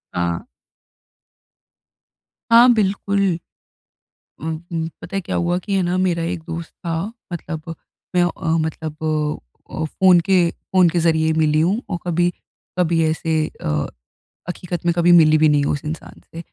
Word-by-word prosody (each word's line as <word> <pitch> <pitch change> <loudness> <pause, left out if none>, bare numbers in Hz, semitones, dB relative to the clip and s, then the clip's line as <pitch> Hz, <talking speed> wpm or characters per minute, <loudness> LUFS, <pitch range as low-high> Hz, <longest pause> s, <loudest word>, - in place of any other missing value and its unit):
हाँ। 85 -1 -1 2.1
हाँ 240 +2 +8
बिल्कुल। 200 -1 0 1.2
ऊँ 160 0 -2 0.2
ऊँ, 160 0 -1
पता 195 - -6
है - - +1
क्या - - -3
हुआ 175 +1 +1
कि 200 - -2
है 190 - +2
ना 175 +1 0
मेरा 175 -3 +1
एक 170 0 -3
दोस्त 165 0 -6
था। 170 -2 -4 0.4
मतलब 165 -1 -5 0.4
मैं 175 - +4
अ, 175 -1 -2
मतलब 160 -1 -3 0.7
अ - - -10
अ, 160 - -2
फ़ोन 180 +2 +4
के 180 -2 +3
फ़ोन 185 -2 +2
के 175 +1 0
ज़रिए 160 -1 +2
मिली 155 -1 +2
हूँ। 195 +8 +2
और 175 - -1
कभी 175 +1 +2 0.5
कभी 170 -2 +2
ऐसे 160 0 -1 0.2
अ, 75 -1 -1 0.6
हक़ीकत 175 -1 -5
में 170 - +4
कभी 175 0 +4
मिली 155 -1 +5
भी 155 0 +5
नहीं 145 -1 +3
हूँ - - +1
उस 145 - -4
इंसान 160 +1 -7
से। - - -7
170 Hz, 160 wpm, -20 LUFS, 160-180 Hz, 2.1 s, हाँ